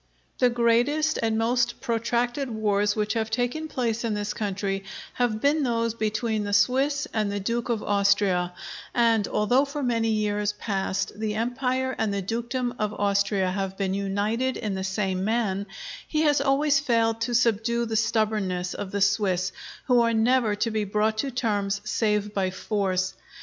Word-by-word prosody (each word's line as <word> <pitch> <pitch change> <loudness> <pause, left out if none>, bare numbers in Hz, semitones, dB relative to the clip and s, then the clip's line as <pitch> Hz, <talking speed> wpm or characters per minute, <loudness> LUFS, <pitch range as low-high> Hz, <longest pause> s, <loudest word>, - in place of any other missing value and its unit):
The 250 - +5
greatest 245 +7 +2
and 225 -1 +1
most 240 +1 +1
protracted 240 +3 -1
wars 210 -2 +1
which 210 -1 0
have 225 -2 -1
taken 245 +7 -1
place 235 -5 -2
in 225 -2 -1
this 210 0 -2
country 195 -2 -2 0.3
have 240 -3 0
been 295 +2 +3
those 230 -3 0
between 220 0 -1
the 205 0 -3
Swiss 270 +8 +2
and 215 -2 0
the 205 - -2
Duke 235 +5 -2
of 230 -3 -1
Austria; 200 -3 +2 0.4
and 230 -3 +3
although 225 +6 +2
for 285 0 -4
many 230 -2 +1
years 210 -1 0
past 195 -1 -2
the 215 -1 -2
Empire 255 +3 -1
and 220 -2 +1
the 200 -1 -2
dukedom 235 +4 -2
of 210 -1 -1
Austria 200 -2 +1
have 195 0 -3
been 195 -2 -1
united 205 +6 -1
in 215 -3 -3
the 190 0 -3
same 190 -1 -1
man, 205 -2 0 0.4
he 310 - 0
has 290 -2 +3
always 280 +1 +3
failed 230 -4 +1
to 240 +1 0
subdue 235 0 +2
the 225 -1 -3
stubbornness 215 -5 0
of 200 - -5
the 200 +1 -3
Swiss, 195 -3 +2 0.3
who 250 -2 +4
are 230 -1 +2
never 225 -1 +3
to 225 +2 -1
be 215 -1 0
brought 215 +2 0
to 275 - 0
terms 205 -5 -1
save 210 -1 0
by 190 -2 0
force. 185 -1 -1
220 Hz, 170 wpm, -26 LUFS, 205-240 Hz, 0.4 s, The